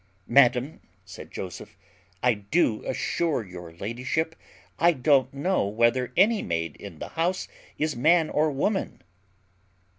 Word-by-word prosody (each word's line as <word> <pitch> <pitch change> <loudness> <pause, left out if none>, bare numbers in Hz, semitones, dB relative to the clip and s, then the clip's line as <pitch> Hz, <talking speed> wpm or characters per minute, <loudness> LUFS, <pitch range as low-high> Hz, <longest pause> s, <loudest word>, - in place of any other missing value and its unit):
"Madam," 125 +2 +3 0.3
said - - -10
Joseph, 90 -2 -8 0.5
"I 125 -1 +4
do 110 - 0
assure 160 -10 -1
your 90 -2 -10
ladyship 125 - -3 0.4
I 170 +1 +5
don't 135 -2 +3
know 145 - 0
whether 115 +4 +1
any 210 +3 +4
maid 85 -2 -3
in 100 -6 -10
the - - -7
house 175 +3 -1 0.3
is 155 +1 -1
man 160 +6 +4
or 155 +1 +2
woman." 190 +8 -2
130 Hz, 125 wpm, -26 LUFS, 110-160 Hz, 0.5 s, I